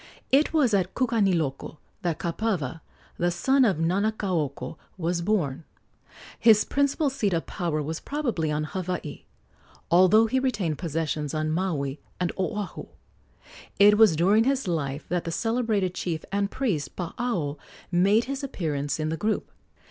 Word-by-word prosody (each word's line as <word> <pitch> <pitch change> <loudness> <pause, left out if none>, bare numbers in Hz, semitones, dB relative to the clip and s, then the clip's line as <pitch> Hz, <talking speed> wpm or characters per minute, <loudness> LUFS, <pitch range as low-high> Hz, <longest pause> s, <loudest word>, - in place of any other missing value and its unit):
It 280 +4 +4
was 285 -8 +3
at 190 -2 +1
Kukaniloko 185 - 0 0.2
that 170 -3 -1
Kapawa, 170 - -2 0.4
the 175 - +2
son 265 +11 +3
of 200 -9 +3
Nanakaoko, 170 -6 -1 0.2
was 170 0 -1
born. 170 -8 0 0.8
His 215 -2 +6
principal 280 +1 +1
seat 215 -8 0
of 165 - -1
power 165 -5 -2
was 160 +3 -4
probably 240 - -2
on 150 0 -1
Hawaii, 180 -2 -5 0.7
although 185 +6 +6
he 260 +4 +1
retained 205 - -1
possessions 155 -3 -2
on 155 0 -1
Maui 155 -5 -1 0.2
and 180 -1 0
Oahu. 190 +2 -3 0.9
It 205 +1 +7
was 215 -7 +7
during 200 +8 +4
his 270 -4 0
life 145 -4 -2
that 175 0 0
the 165 - -4
celebrated 220 -2 0
chief 165 -3 -3
and 200 0 0
priest 180 - -2
Paao 175 - -2 0.3
made 195 +6 +4
his 275 +3 -5
appearance 150 - -2
in 155 0 -1
the 160 - -2
group. 215 +3 -1
180 Hz, 140 wpm, -26 LUFS, 160-220 Hz, 0.9 s, It